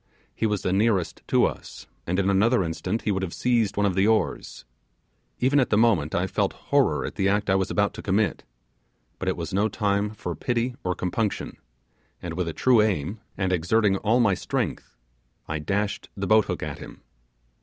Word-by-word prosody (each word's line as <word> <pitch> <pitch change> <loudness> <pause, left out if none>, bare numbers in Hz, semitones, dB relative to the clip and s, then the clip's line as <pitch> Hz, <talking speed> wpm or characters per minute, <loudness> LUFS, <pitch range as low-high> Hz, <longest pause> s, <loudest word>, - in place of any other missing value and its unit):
He 110 - 0
was 105 -2 -2
the 90 - 0
nearest 100 -3 +1
to - - +4
us, - - -6 0.2
and 90 +2 0
in 95 -1 +1
another 100 +3 +3
instant 90 +6 -3
he 105 - 0
would 95 -1 -1
have 95 -3 -4
seized 120 -5 +1
one 105 - +2
of 100 - +1
the 95 +3 +2
oars. 110 - -1 0.7
Even 135 +3 +3
at 130 - +2
the 105 - +3
moment 100 -10 +2
I 90 - +1
felt 95 - -1 0.2
horror - - +3
at - - -5
the 95 0 +2
act 100 0 +1
I - - +4
was 95 -1 0
about 100 0 +1
to - - -8
commit; 100 +2 0 0.8
but - - -4
it - - 0
was - - -5
no 100 +3 +2
time 100 -1 0
for 95 -4 -5
pity 120 - -1
or 90 -1 -1
compunction, 100 +4 -2 0.6
and 85 -2 -6
with 90 0 -2
a - - -1
true 125 +2 +4
aim, 100 -1 -1 0.2
and 95 -1 0
exerting 95 +4 +2
all 110 +5 +2
my 110 -5 +4
strength, 90 - -3 0.5
I 80 0 -3
dashed 100 +6 -2
the 100 - -2
boat 110 +2 +4
hook - - -4
at - - -5
him. - - -11
100 Hz, 200 wpm, -25 LUFS, 95-110 Hz, 0.8 s, to